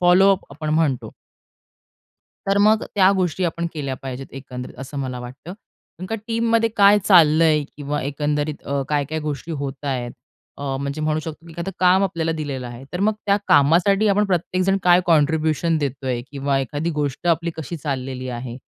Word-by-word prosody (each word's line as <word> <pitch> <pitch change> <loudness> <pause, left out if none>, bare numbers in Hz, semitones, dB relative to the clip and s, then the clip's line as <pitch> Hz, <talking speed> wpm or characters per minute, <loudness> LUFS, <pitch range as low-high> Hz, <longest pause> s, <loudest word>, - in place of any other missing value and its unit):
Follow 180 +2 +6
up 190 - -3
आपण 155 +2 -6
म्हणतो. 150 -6 0 1.4
तर 195 +1 +2
मग 220 +1 +4
त्या 190 -1 +6
गोष्टी 185 -1 0
आपण 170 0 -2
केल्या 140 -4 -3
पाहिजेत, 135 0 -6
एकंदरीत 130 -2 -8
असं 135 +2 -7
मला 130 -2 -4
वाटतं. 125 +7 -9 0.5
कारण 180 - -6
का 225 - -2
टीममध्ये 230 0 +2
काय 200 0 +7
चाललंय? 160 -4 +5
किंवा 145 0 -3
अ, - - -5
एकंदरीत 145 +1 -1 0.3
काय-काय 150 +1 -1
गोष्टी 150 +2 -5
होतायेत? 135 -4 -3 0.5
अ, - - -7 0.2
म्हणजे 140 +2 -4
म्हणू 155 0 0
शकतो, 160 +1 -8
की 165 - -12
एखादं 170 +4 -5
काम 185 +2 +5
आपल्याला 165 -4 -1
दिलेलं 140 -5 -4
आहे. 120 +2 -9
तर 180 - -3
मग 215 +2 +2
त्या 200 0 +3
कामासाठी 185 +6 +4
आपण 205 +1 +3
प्रत्येकजण 185 +1 +1
काय 180 0 +6
कॉन्ट्रिब्युशन 160 0 +2
देतोय, 135 -4 -2
किंवा 140 0 0
एखादी 145 +5 -2
गोष्ट 145 +3 -2
आपली 170 0 +1
कशी 160 +2 -5
चाललेली 130 -3 -4
आहे? 120 0 -6
155 Hz, 165 wpm, -22 LUFS, 140-180 Hz, 1.4 s, काय